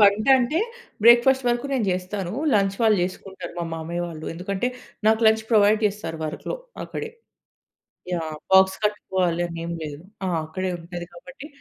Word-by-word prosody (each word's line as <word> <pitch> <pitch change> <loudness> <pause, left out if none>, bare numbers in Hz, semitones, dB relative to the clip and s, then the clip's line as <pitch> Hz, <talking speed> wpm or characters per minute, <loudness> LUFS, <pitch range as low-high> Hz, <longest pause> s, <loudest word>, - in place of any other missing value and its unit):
వంట 205 +2 +5
అంటే 260 +7 +1 0.5
బ్రేక్‌ఫాస్ట్ 245 +2 +6
వరకు 240 +3 0
నేను 250 -5 +1
చేస్తాను. 185 0 -3 0.2
లంచ్ 195 -1 +2
వాళ్ళు 215 -2 +5
చేసుకుంటారు 190 +1 -6
మా 170 - -1
మామయ్య 170 +2 -4
వాళ్ళు. 160 -2 -8
ఎందుకంటే, 190 +6 -2 0.4
నాకు 220 +1 +4
లంచ్ 220 0 +4
ప్రొవైడ్ 215 0 +5
చేస్తారు 200 -5 -4
వర్క్‌లో 155 - -4 0.3
అక్కడే. 450 - -5 1.0
యాహ్! 160 -3 -3 0.2
బాక్స్ 190 0 +6
కట్టుకోవాలి 185 -4 0
అని 170 -1 -7
ఏమి 170 0 -4
లేదు. 150 -1 -6 0.3
ఆ! - - 0 0.2
అక్కడే 185 +4 -3
ఉంటది 175 0 -7
కాబట్టి 270 +11 -11
190 Hz, 150 wpm, -24 LUFS, 175-220 Hz, 1.0 s, బ్రేక్‌ఫాస్ట్